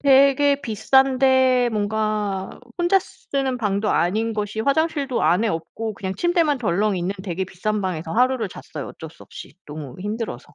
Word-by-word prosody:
되게 280 +1 +5
비싼데 260 +2 +3
뭔가 210 -2 -1 0.3
혼자 350 +3 +4
쓰는 270 -7 -3
방도 210 -1 0
아닌 215 +6 +1
것이 210 +1 -3
화장실도 280 0 0
안에 210 +6 +3
없고 210 +6 -4
그냥 190 -1 -4
침대만 340 -5 +2
덜렁 205 -2 +1
있는 180 +3 -2
되게 190 0 -2
비싼 205 +3 -2
방에서 165 -3 -3
하루를 250 -1 +2
잤어요. 150 -5 -8
어쩔 160 - -9
수 - - -16
없이. - - -11
너무 150 -4 -8
힘들어서. 205 - -5
220 Hz, 330 characters per minute, -22 LUFS, 190-265 Hz, 0.3 s, 되게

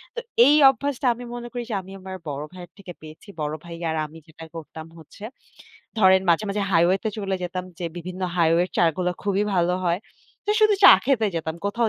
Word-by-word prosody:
তো - - -2 0.3
এই 290 +3 +6
অভ্যাসটা 275 0 -2
আমি 240 +1 -10
মনে 240 0 -7
করি 245 -1 -4
যে - - -3
আমি 190 +1 -14
আমার 190 0 -8
বড় 145 0 -4
ভাইয়ের 180 -1 -11
থেকে 190 -3 -10
পেয়েছি। 155 +5 -13
বড় 150 0 -2
ভাই 170 -1 -9
আর 160 - -2
আমি 155 +2 -12
যেটা 160 +1 -13
করতাম 160 0 -9
হচ্ছে, 160 +5 -15 0.8
ধরেন 190 -2 +5
মাঝে, 170 +5 +2
মাঝে 200 +1 -1
highway-তে 180 +5 +2
চলে 195 -2 -2
যেতাম 180 +1 -4
যে 175 - -5
বিভিন্ন 180 +2 -7 0.2
highway 170 0 +3
এর - - -23
চা - - +3
গুলা 180 -1 -1
খুবই 200 0 0
ভালো 175 0 +2
হয়। 175 +2 0 0.5
তো - - +4
শুধু 430 -1 +5
চা - - +12
খেতে 245 -4 +2
যেতাম, 160 -1 -3
কোথাও 230 +3 0
185 Hz, 205 wpm, -23 LUFS, 165-215 Hz, 0.8 s, চা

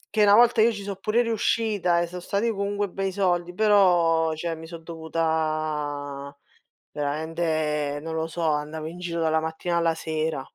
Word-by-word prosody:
Che 215 - +3
una 205 0 +7
volta 235 -1 +5
io 230 +2 +5
ci 205 -2 -6
so' 200 0 -4
pure 215 +5 +1
riuscita, 215 -5 +1
eh, 170 - +1
so' 180 +1 -7
stati 200 +6 -1
comunque 200 0 -1
bei 195 +1 -3
soldi, 180 -2 0
però 175 -6 +4
cioè 165 +1 -3
mi 160 0 -9
son 165 -1 -9
dovuta 155 -3 -2 0.6
veramente 150 -1 -1
non 160 0 -5
lo 160 0 -1
so, 165 +1 -5
andavo 150 +1 -2
in 165 +2 -7
giro 175 -1 -4
dalla 160 -1 +2
mattina 160 +2 -3
alla 165 -1 +2
sera. 155 -2 -2
165 Hz, 170 wpm, -25 LUFS, 155-195 Hz, 0.6 s, una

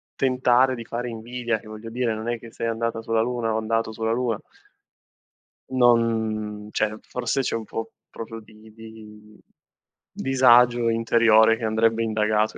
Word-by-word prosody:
tentare 130 0 +2
di 115 -2 -8
fare 120 +1 -4
invidia, 115 0 -3
che 110 - -16
voglio 110 +1 -9
dire, 120 -1 -1
non 110 +2 -5
è 120 -1 -2
che 115 -1 -12
sei 115 - -4
andata 115 0 -2
sulla 115 0 0
luna 115 -2 -1
o - - 0
andato 115 0 -1
sulla 110 0 -2
luna. 120 -3 -1 1.3
Non 110 -4 +1
cioè, 110 0 -1
forse 125 +2 -2
c'è 125 - -2
un 115 - -3
po' 115 +1 -6 0.2
proprio 115 0 -8
di 110 - -19 0.2
vi 110 0 -12
di 105 -1 -15 0.7
disagio 125 -2 +4
interiore 115 -1 +4
che 115 - -9
andrebbe 115 +1 +1
indagato 110 -1 0
115 Hz, 160 wpm, -24 LUFS, 110-120 Hz, 1.3 s, disagio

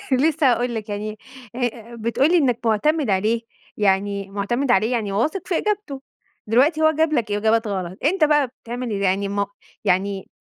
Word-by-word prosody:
لسه 285 0 +3
هاقول 240 0 -1
لك، 220 -1 -5
يعني 210 +1 -4 0.4
ه - - -6
آآ، 235 -2 -3
آآ - - -9
بتقول 235 +6 +1
لي 355 - +5
إنّك 260 -8 +2
مُعتمد 265 +5 +1
عليه، 215 +5 +1 0.3
يعني 200 -1 0
مُعتمد 240 +7 -1
عليه 220 +2 +3
يعني 215 -5 -1
واثق 305 - -1
في 350 - +1
إجابته، 410 -10 -2 0.5
دلوقتي 270 +9 +3
هو 315 - +6
جاب 315 0 +1
لك 230 -7 0
إجابات 220 +2 +2
غلط، 185 -1 -4
أنت 335 +2 +3
بقى 295 -2 +3 0.2
بتعمل 245 +2 -5
ال 200 - -2
يعني 195 +1 +1
م 200 0 0 0.4
يعني 190 +1 0
230 Hz, 185 wpm, -22 LUFS, 205-285 Hz, 0.5 s, هو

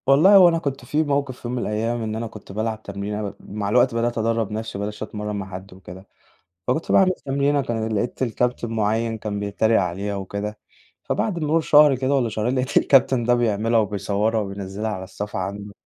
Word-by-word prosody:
والله 155 +9 +6
هو 185 -3 +9
أنا 165 - +1
كنت 140 -5 -4
في 150 +5 +1
موقف 140 -3 -1
في - - -7
يوم 120 - -3
من - - -1
الأيام 115 +2 -1
إن 110 -1 -3
أنا 115 +1 -3
كنت 105 -3 -12
بالعب 110 +1 -3
تمرينة، 100 +1 -4
م 100 - -14
مع 100 0 -5
الوقت 125 +2 +3
بدأت 120 +1 0
أدرّب 115 -1 0
نَفْسي 110 -1 -4
وما 100 - -2
بقيتش 105 0 -5
أتمرّن 105 0 -5
مع 100 -1 -5
حد 95 +1 -9
وكده، 95 +1 -12 0.6
فكنت 145 +6 0
باعمل 190 -1 +5
تمرينة 140 +1 +1
كان 115 -2 -2
لقيت 120 +5 -2
الكابتن 125 0 -1
مُعيّن 110 +1 0
كان 105 -1 -4
بيتريق 105 +2 +2
عليها 95 +3 -2
وكده، 100 +2 -5 0.4
فبعد 190 -5 -1
مرور 160 +1 +1
شهر 150 -2 +6
كده 130 +2 0
والّا 130 -4 +2
شهرين 110 +3 -1
لقيت 130 +1 -2
الكابتن 130 -2 +4
ده 120 +1 +3
بيعملها 115 -1 +1
وبيصورها 105 +2 0
وبينزّلها 100 +1 -4
على 95 -3 -5
الصفحة 105 +2 -6
عنده. 100 +2 -5
110 Hz, 200 wpm, -23 LUFS, 105-125 Hz, 0.6 s, هو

